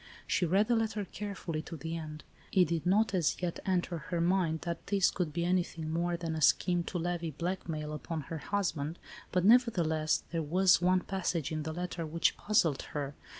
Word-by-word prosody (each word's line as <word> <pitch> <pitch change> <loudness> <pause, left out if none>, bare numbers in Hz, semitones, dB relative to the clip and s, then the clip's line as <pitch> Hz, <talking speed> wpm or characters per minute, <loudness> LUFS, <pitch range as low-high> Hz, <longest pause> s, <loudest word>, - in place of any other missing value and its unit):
She 180 - +1
read 195 +5 +3
the 240 - +3
letter 220 -2 -1
carefully, 185 -5 -5
to 165 +1 -8
the 160 +1 -4
end. 155 -2 -7 0.3
It 180 -5 +4
did 170 0 -1
not, 205 +2 +3
as 175 -6 +1
yet, 175 -2 -2
enter 180 -2 0
her 175 +2 -3
mind 170 -2 +1
that 170 -1 -5
this 195 -3 +3
could 175 -5 -2
be 170 +2 -1
anything 170 -3 -1
more 170 +1 0
than 165 -1 -3
a 160 - -3
scheme 175 +4 +3
to 180 - -3
levy 175 -1 -2
blackmail 155 -1 -3
upon 160 +1 -4
her 160 +3 -6
husband, 170 -3 -2 0.3
but, 180 0 +1
neverthe 230 -6 +5
less, 155 -1 +1
there 165 -1 -1
was 180 +4 +4
one 185 +1 +3
passage 175 -5 -2
in 155 -1 -2
the 160 +1 -4
letter 175 +1 -4
which 165 +1 +1
puzzled 170 -9 +2 0.2
her. 140 -1 -3
170 Hz, 195 wpm, -31 LUFS, 160-185 Hz, 0.3 s, neverthe